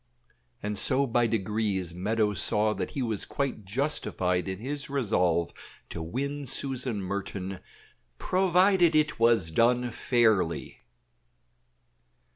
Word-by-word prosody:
And 105 0 -2
so 135 +2 +3
by 120 -1 +2
degrees 105 -5 -1
Meadows 105 +1 0
saw 105 +1 +2
that - - -4
he 135 - -3
was 110 -4 -2
quite 135 -7 -3
justified 95 - -1
in 95 0 -3
his 140 +6 -5
resolve 90 -11 +1 0.4
to 85 - -6
win 140 - -4
Susan 130 -4 -2
Merton, 95 0 -4 0.6
PROVIDED 185 - +3
IT 155 -4 +2
WAS 115 -8 +3
DONE 120 +5 +2
FAIRLY. 110 -9 +1
115 Hz, 110 wpm, -28 LUFS, 95-135 Hz, 0.6 s, so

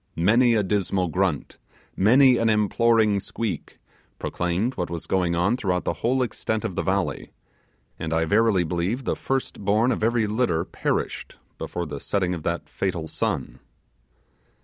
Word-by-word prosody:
Many 115 +8 +4
a 105 - +2
dismal 95 -2 0
grunt, 90 -4 -1 0.4
many 125 +5 +5
an 115 -1 +2
imploring 110 0 +3
squeak, 100 -4 -5 0.4
proclaimed 90 +8 -1
what 90 - -3
was 85 -1 -5
going 90 -3 +1
on 95 +7 +2
throughout 90 -7 -1
the - - -1
whole 130 +3 +2
extent 110 -2 -3
of - - -2
the - - -1
valley; - - -1 0.7
and 80 - -4
I 80 0 +2
verily 105 0 +3
believe 90 +10 -2
the - - -1
first 135 -5 -3
born 110 +5 +3
of 110 - -2
every 115 0 +2
litter 105 -6 0
perished - - -3 0.2
before 90 - -4
the 75 -2 -6
setting 90 +2 -1
of 85 - -5
that 85 +2 -3
fatal 85 -4 -3
sun. - - -3
100 Hz, 155 wpm, -24 LUFS, 85-115 Hz, 0.7 s, many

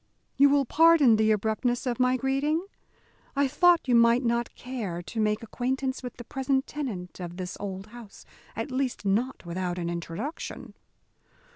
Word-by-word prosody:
"You 280 +1 +6
will 280 -1 +3
pardon 315 -4 +6
the 220 0 +3
abruptness 220 +4 0
of 245 -1 -2
my 255 0 +3
greeting? 280 +6 0 0.7
I 280 0 +3
thought 340 +3 +4
you 250 - +2
might 235 +2 +5
not 235 0 -1
care 215 -9 -5
to 225 - -6
make 210 +1 +1
acquaintance 260 +3 -2
with 250 -2 -8
the 240 - -8
present 265 +2 -1
tenant 210 -14 -6
of 175 -1 -7
this 180 -1 -5
old 195 -1 -5
house 220 -2 -13 0.3
at 290 - -4
least 255 -4 -2
not 220 +4 0
without 175 +1 -3
an 170 -1 -2
introduction." 175 - -6
240 Hz, 160 wpm, -27 LUFS, 205-270 Hz, 0.7 s, You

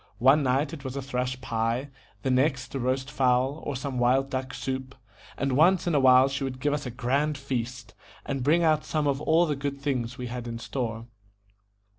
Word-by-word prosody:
One 135 +5 +5
night 140 +4 +1
it 145 - -8
was 130 -1 -5
a 140 - -2
thrush 125 -1 -2
pie, 115 +3 -1 0.3
the 130 - +1
next 130 0 +1
a 135 - -2
roast 130 +2 -1
fowl, 130 +1 +1
or 145 - -3
some 130 0 -3
wild 130 +3 +2
duck 130 -1 -3
soup; 130 +1 -4 0.4
and 140 -1 0
once 175 +5 +4
in 175 - 0
a 145 - +4
while 130 0 +6
she 135 +1 -3
would 130 -1 -4
give 145 +2 0
us 145 -2 -3
a - - -3
grand 140 +5 0
feast, 125 -4 -4 0.3
and 135 -2 -2
bring 160 +6 +3
out 155 -2 +3
some 155 -2 -1
of 140 0 0
all 165 +3 +4
the 150 -3 -1
good 140 0 -4
things 125 -3 -2
we 125 - -5
had 120 0 -5
in 115 0 -4
store. 115 -2 -4
135 Hz, 210 wpm, -27 LUFS, 125-140 Hz, 0.4 s, while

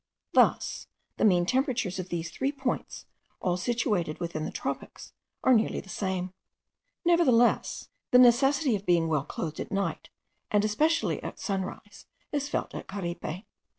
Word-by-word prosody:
Thus - - +2 0.3
the - - +2
mean 180 -4 +4
temperatures 250 -5 0
of 185 0 -5
these 170 -1 -3
three 270 +10 -1
points, 270 -3 -4 0.3
all 180 -1 0
situated 180 -5 -1
within 170 -3 -3
the - - -4
tropics, - - -5 0.3
are 260 - +6
nearly 225 -2 +2
the 195 - -12
same. 185 -1 -2 0.7
The 270 -9 +3 0.3
necessity 255 +2 +5
of 200 - -4
being 170 -2 +3
well 150 -3 0
clothed 155 -1 -5
at - - -5
night, 195 0 -2 0.4
and 210 0 +2
especially 310 +10 +1
at - - -6
sunrise, 195 +1 -5 0.2
is 290 -1 -1
felt - - -2
at - - -7
Caripe. 180 -1 -5
205 Hz, 145 wpm, -28 LUFS, 175-255 Hz, 0.7 s, are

